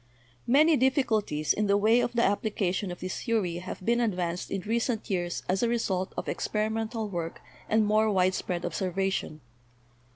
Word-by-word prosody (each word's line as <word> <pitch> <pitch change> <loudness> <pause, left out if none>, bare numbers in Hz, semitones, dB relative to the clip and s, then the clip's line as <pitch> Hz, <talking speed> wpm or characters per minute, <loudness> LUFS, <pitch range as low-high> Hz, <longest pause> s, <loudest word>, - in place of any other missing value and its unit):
Many 300 +5 +5
difficulties 225 - +1
in 210 0 0
the 200 0 +4
way 220 +4 +4
of 240 - 0
the 235 0 +2
application 200 -2 0
of 175 - -8
this 185 +1 -4
theory 210 -8 0
have 180 +1 -7
been 235 +1 +2
advanced 180 -6 -1
in 195 - -2
recent 230 +2 -1
years 175 -2 -2
as 185 +1 +1
a 235 - +2
result 195 -5 -1
of - - -3
experimental 220 +1 -2
work 170 -4 -4 0.3
and 220 0 +3
more 215 +1 +3
widespread 185 -2 0
observation. 190 -4 -2
205 Hz, 160 wpm, -28 LUFS, 185-230 Hz, 0.3 s, Many